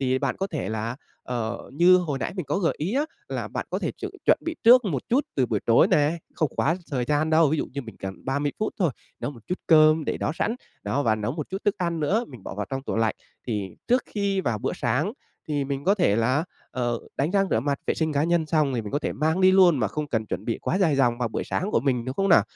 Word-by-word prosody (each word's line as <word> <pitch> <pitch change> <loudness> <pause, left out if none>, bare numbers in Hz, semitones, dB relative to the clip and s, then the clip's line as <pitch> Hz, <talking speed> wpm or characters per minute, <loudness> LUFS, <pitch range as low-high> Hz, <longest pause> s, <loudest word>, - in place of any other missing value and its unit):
Thì 130 -1 +1
bạn - - -1
có 195 - -1
thể 160 -7 -4
là, 110 +2 -3 0.3
ờ, 120 -2 -4
như 175 +5 +6
hồi 160 -7 -1
nãy - - -3
mình 180 -6 -3
có 145 - 0
gợi 175 -4 +1
ý 175 +9 -2
á, 285 +3 +2 0.2
là - - -3
bạn - - -4
có - - -1
thể - - -2
chuẩn - - -7
chuẩn - - +5
bị 330 -1 -2
trước 245 +1 +8
một 145 -10 -1
chút 265 +5 +2
từ 130 -3 +2
buổi 110 -4 -1
tối 115 - +5
nè, 150 +3 +2 0.2
không 155 - +1
quá 165 +4 +2
thời 125 -3 0
gian 150 +3 +1
đâu, 160 -1 +5
ví 155 - 0
dụ - - -1
như 140 +1 -4
mình 115 -5 -11
cần 95 0 -7
30 140 +2 -1
phút 215 - -1
thôi, 175 -6 +2 0.3
nấu - - -2
một 120 -5 -12
chút 180 - -2
cơm 155 -1 +6
để - - -1
đó - - -1
sẵn, 225 +7 -1 0.3
đó, 145 - 0
và 110 -4 +3
nấu 110 +2 -2
một 155 -1 -5
chút 190 - -3
thức 205 - +2
ăn 170 -2 -1
nữa 205 +11 +1
mình 125 -7 -12
bỏ - - -6
vào 105 0 -3
trong 135 0 -3
tủ - - -3
lạnh. 110 -1 +2 0.3
Thì 105 -5 -2 0.2
trước 250 +1 +4
khi 200 -2 -1
vào 115 -10 -1
bữa - - -2
sáng 130 - 0 0.4
thì 145 -2 0
mình 140 0 -4
có 195 +2 +4
thể 175 - +2
là, 130 +8 +2 0.3
ờ, 120 -2 -1 0.2
đánh 145 +4 0
răng 195 0 +2
rửa 110 - +2
mặt, 140 +1 -1
vệ - - +1
sinh 160 -1 -1
cá 145 +1 +1
nhân 170 -1 +1
xong 155 -4 +2
thì 115 - -1
mình 105 - -6
có 145 - +2
thể - - -3
mang 160 +4 0
đi 185 0 +6
luôn 185 -5 +6
mà - - +1
không 150 -1 -4
cần 110 -4 -1
chuẩn 95 +2 -4
bị 115 - -2
quá 185 - -1
dài 165 -8 +3
dòng 120 -3 +2
vào 120 -2 0
buổi - - -3
sáng 195 +4 -2
của - - +2
mình, 125 -2 0
đúng 130 - -4
không 195 +4 +1
nào? 170 - +7
145 Hz, 280 wpm, -25 LUFS, 125-175 Hz, 0.4 s, trước